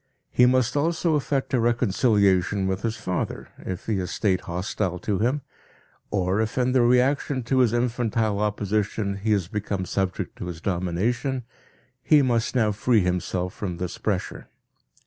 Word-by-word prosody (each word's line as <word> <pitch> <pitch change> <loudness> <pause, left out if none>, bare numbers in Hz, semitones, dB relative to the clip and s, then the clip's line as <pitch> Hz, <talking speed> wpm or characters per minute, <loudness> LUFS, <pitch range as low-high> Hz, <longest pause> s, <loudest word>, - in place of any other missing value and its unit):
He 125 - +5
must 130 -1 +2
also 165 +2 +1
effect 140 -2 -1
a 130 - +3
reconciliation 100 -4 +2
with 95 +1 -1
his 110 0 -2
father, 90 -1 -3
if 95 -1 -6
he 110 -3 0
has 90 - -3
stayed 95 -4 0
hostile 90 +1 -2
to 100 +2 -2
him, 130 +6 0 0.7
or 95 +1 +1
if 110 +2 -3
in 125 0 +2
the 130 -1 +4
reaction 130 +2 +2
to 130 +3 +1
his 125 -4 +4
infantile 115 -3 0
opposition 105 -1 -1
he 105 +2 -1
has 95 -5 0
become 100 -2 -3
subject 95 0 -2
to - - -6
his 85 -2 -6
domination, 100 - -1 0.6
he 150 +2 +5
must 120 -1 0
now 110 -4 +3
free 110 +2 +2
himself 90 0 -1
from 90 -4 -4
this 90 0 -5
pressure. 100 -4 -3
105 Hz, 160 wpm, -25 LUFS, 95-125 Hz, 0.7 s, He